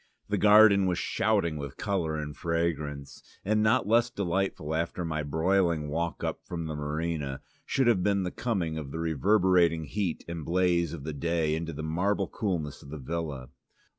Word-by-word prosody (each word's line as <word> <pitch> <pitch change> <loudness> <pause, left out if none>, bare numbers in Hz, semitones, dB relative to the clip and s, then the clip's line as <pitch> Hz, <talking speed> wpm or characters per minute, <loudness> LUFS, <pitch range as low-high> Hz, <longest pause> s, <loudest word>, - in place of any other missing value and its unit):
The - - +1
garden 105 -2 +7
was 90 -1 0
shouting 90 -4 0
with 70 -2 -7
colour 90 -7 -1
and 75 -1 -5
fragrance, 75 -4 -2 0.2
and 105 +2 +2
not 110 +2 +3
less 115 +2 +4
delightful 95 -6 -2
after 85 +2 -2
my 80 -1 -2
broiling 80 +1 +1
walk 85 +2 -2
up - - -2
from 85 -2 -5
the 80 - -4
marina, 75 -2 -3 0.3
should 135 - +1
have 115 -6 +3
been 100 0 +1
the 90 - -3
coming 90 -10 -2
from 75 -3 -5
the 80 - -6
reverberating 85 +1 +3
heat 90 +2 -3
and 85 -2 -5
blaze 85 -1 +1
of 75 -5 -7
the 80 +1 -4
day 80 +1 0
into 80 +1 -3
the 80 0 -6
marble 95 +5 0
coolness 85 - -3
of 70 - -13
the 75 - -6
villa. 75 -3 -4
85 Hz, 175 wpm, -28 LUFS, 75-95 Hz, 0.3 s, garden